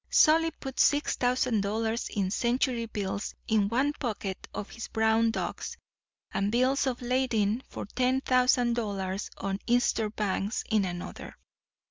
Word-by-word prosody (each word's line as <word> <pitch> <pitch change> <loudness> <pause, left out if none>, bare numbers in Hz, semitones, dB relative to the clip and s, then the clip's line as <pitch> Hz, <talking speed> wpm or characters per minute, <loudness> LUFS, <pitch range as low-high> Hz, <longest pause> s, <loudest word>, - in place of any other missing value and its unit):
"Solly 325 +1 +5
puts 270 -4 -3
six 290 +1 +3
thousand 245 -3 +1
dollars 220 +3 -1
in 195 -3 -1
century 240 0 0
bills 200 -2 -3
in 210 -2 +2
one 265 +6 +1
pocket 210 -8 -4
of 205 - -6
his 230 - -6
brown 220 0 +2
ducks, 225 - -4 0.5
and 200 +1 0
bills 260 +4 +2
of 250 -1 -2
lading 240 -3 +1
for - - -6
ten 255 +5 +1
thousand 250 -2 +3
dollars 195 -3 -2
on 195 0 -3
Eastern 235 -2 +2
banks 205 +1 -1
in 215 -3 +3
another. 175 -1 -6
230 Hz, 140 wpm, -29 LUFS, 205-255 Hz, 0.5 s, Solly